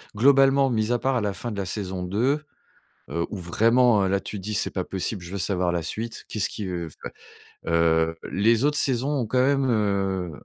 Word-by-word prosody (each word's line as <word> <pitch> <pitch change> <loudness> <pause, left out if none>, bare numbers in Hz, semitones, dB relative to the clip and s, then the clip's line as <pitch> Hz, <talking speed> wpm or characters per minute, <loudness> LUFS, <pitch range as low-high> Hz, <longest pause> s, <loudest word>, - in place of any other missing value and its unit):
globalement, 135 +3 +5
mise 110 0 0
à 120 - +3
part 135 +2 0
à 120 - +1
la 100 -1 -1
fin 120 +4 -5
de 105 - -6
la 100 - -2
saison 95 -1 -3
2, 115 +11 0 0.7
heu, 85 0 -2
où - - -5
vraiment, 115 +5 +3
heu, - - +1
là 100 +1 +1
tu 105 - -6
dis: 105 +3 -4
«C'est - - 0
pas 95 - -2
possible, 95 +1 -3
je 85 - -9
veux 100 - -4
savoir 90 -1 0
la 85 -1 -1
suite, 110 +7 -5
qu'est-ce 105 -3 -1
qui 105 - -6
veut 85 -3 -4
f». - - -13 0.7
Heu, 80 -1 +2 0.2
les 115 +6 +3
autres 150 0 +2
saisons 135 +1 +1
ont 115 - -3
quand 125 - -1
même, 135 -1 +2
heu, 95 -5 0
105 Hz, 220 wpm, -24 LUFS, 90-120 Hz, 0.7 s, globalement